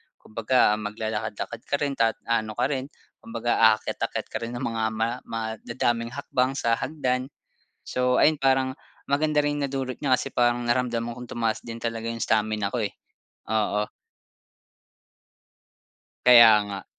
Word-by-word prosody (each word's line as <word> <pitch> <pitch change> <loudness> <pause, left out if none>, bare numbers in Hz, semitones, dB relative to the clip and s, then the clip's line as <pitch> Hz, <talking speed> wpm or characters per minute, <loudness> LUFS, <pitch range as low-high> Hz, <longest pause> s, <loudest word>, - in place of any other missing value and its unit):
Kumbaga 110 -1 +1
maglalakad-lakad 110 +1 -4
ka 140 - +1
rin 140 0 -1
ta 115 -1 +3
ano 110 -2 -1
ka 130 +4 0
rin, 135 0 -2 0.3
kumbaga 115 +1 -2 0.2
aakyat-akyat - - -4
ka - - -2
rin 120 +1 -5
ng 125 - -4
mga 115 -2 -2
ma 115 +3 -1
madadaming 115 +1 -2
hakbang 135 -1 0
sa 115 -4 +1
hagdan. 130 -4 -1 0.6
So, 125 0 +2
ayun 155 0 +5
parang 130 0 +1 0.3
maganda 150 +1 +2
ring 145 0 -1
nadulot 135 -2 -3
niya 135 -3 +1
kasi 135 - 0
parang 120 -1 +2
naramdaman 120 -1 0
kong 125 -1 -8
tumaas 115 -1 0
din 115 0 -7
talaga 115 -1 -3
yung 115 0 -4
stamina 110 -2 +1
ko 115 -2 -1
eh, - - -5 0.6
oo. 105 -1 0 2.4
Kaya 120 -2 +10 0.2
nga. 100 -1 -6
120 Hz, 140 wpm, -25 LUFS, 110-130 Hz, 2.4 s, Kaya